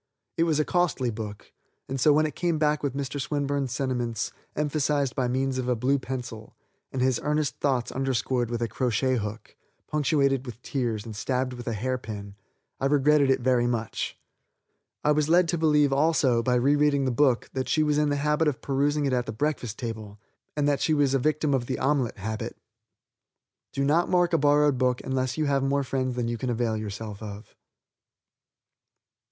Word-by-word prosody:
It 165 - +2
was 155 -3 +1
a 155 - +2
costly 165 -9 +1
book, 105 -2 -7 0.4
and 135 -1 -3
so 150 - +6
when 155 +2 +4
it 150 - -3
came 170 0 0
back 150 -1 +1
with 140 -2 -2
Mr. 140 0 -3
Swinburne's 140 -2 -1
sentiments 125 -4 -2 0.2
emphasized 145 -3 0
by 130 -2 0
means 130 +1 0
of 125 - -3
a 125 - +2
blue 135 +5 +1
pencil, 125 -4 -6 0.4
and 130 - -1
his 130 -2 +2
earnest 150 -1 0
thoughts 130 -4 0
underscored 130 -2 -1
with 120 0 -2
a - - 0
crochet 125 +2 0
hook, 105 0 -6 0.3
punctuated 140 -3 +1
with 120 -3 -9
tears, 120 -6 -2
and 110 -2 -7
stabbed 130 +4 -1
with 120 -1 -9
a 115 - 0
hair 130 +4 -2
pin, 100 -3 -7 0.5
I 135 - +1
regretted 145 0 +4
it 135 - +2
very 120 -1 +2
much. 115 -2 -3 0.9
I 150 - +3
was 150 0 +2
led 175 +1 +5
to 170 - +1
believe, 150 -3 +3
also, 140 -5 +3
by 125 +1 +1
rereading 140 +2 +3
the 130 - +1
book, 130 -1 +2
that 130 -1 -2
she 155 - +3
was 150 -1 +2
in 150 -1 +2
the 145 - +1
habit 150 +2 +1
of 145 -4 0
perusing 145 +2 0
it 135 - 0
at 125 -1 0
the - - -2
breakfast 120 -1 -2
table, 110 -4 -6 0.4
and 145 -1 +2
that 145 -1 +1
she 155 - +2
was 145 -2 +2
a 135 - +3
victim 150 +1 +1
of 125 -3 0
the 130 - -2
omelet 135 -4 0
habit. 110 +2 -5 1.1
Do 140 - -1
not 155 +5 +2
mark 175 -1 +2
a 165 - +4
borrowed 145 -2 +3
book 125 -1 +1
unless 130 0 -1
you 155 - +1
have 140 -1 +1
more 140 +1 +1
friends 130 -1 -2
than 120 -2 -1
you 120 -1 -3
can 130 - -2
avail 115 -2 0
yourself 105 0 -6
of. 105 0 -9
135 Hz, 195 wpm, -26 LUFS, 120-145 Hz, 1.1 s, so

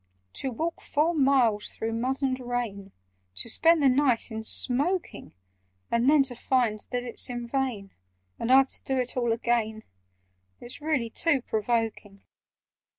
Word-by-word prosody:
"To 270 - -3
walk 325 +8 -4
four 315 +3 0
miles 265 -8 +2
through 225 0 -4
mud 260 +4 -2
and 260 -1 0
rain, 240 -6 -4 0.4
To - - -3
spend 325 +6 +3
the - - +6
night 255 -3 +2
in 220 0 -5
smoking, 285 - +1 0.6
And 235 +3 +3
then 295 -2 +5
to 255 -2 -2
find 235 -3 0
that 245 -1 -2
it's 240 0 0
in 240 -1 -4
vain— 235 -7 -3 0.5
And 235 - -1
I've 265 0 +6
to - - -10
do 265 - -2
it 250 -1 -1
all 240 -2 0
again— 225 -2 -1 0.8
It's 240 +5 -4
really 280 -7 -1
too 295 -4 +1
provoking! 220 -3 -2
245 Hz, 150 wpm, -27 LUFS, 225-270 Hz, 0.8 s, the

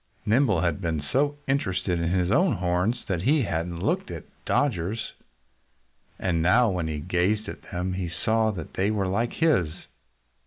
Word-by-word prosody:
Nimble 110 - +3
had 85 +1 0
been 85 -3 -1
so 145 +2 +2
interested 95 -9 0
in 85 0 0
his 90 +1 +1
own 175 - +4
horns 90 +6 0
that 90 -4 -1
he 140 - +3
hadn't 85 -2 -3
looked - - 0
at - - -6 0.2
Dodger's. 110 - 0 1.0
And 85 -3 0
now 110 +6 +4
when 90 -3 -2
he 80 -1 -3
gazed 90 +6 0
at - - -7
them 90 +1 -2
he 90 -2 -3
saw 110 +5 +1
that 90 -7 -6
they 95 +2 +1
were 100 -3 0
like 115 +6 0
his. 145 - +2
95 Hz, 165 wpm, -26 LUFS, 85-115 Hz, 1.0 s, own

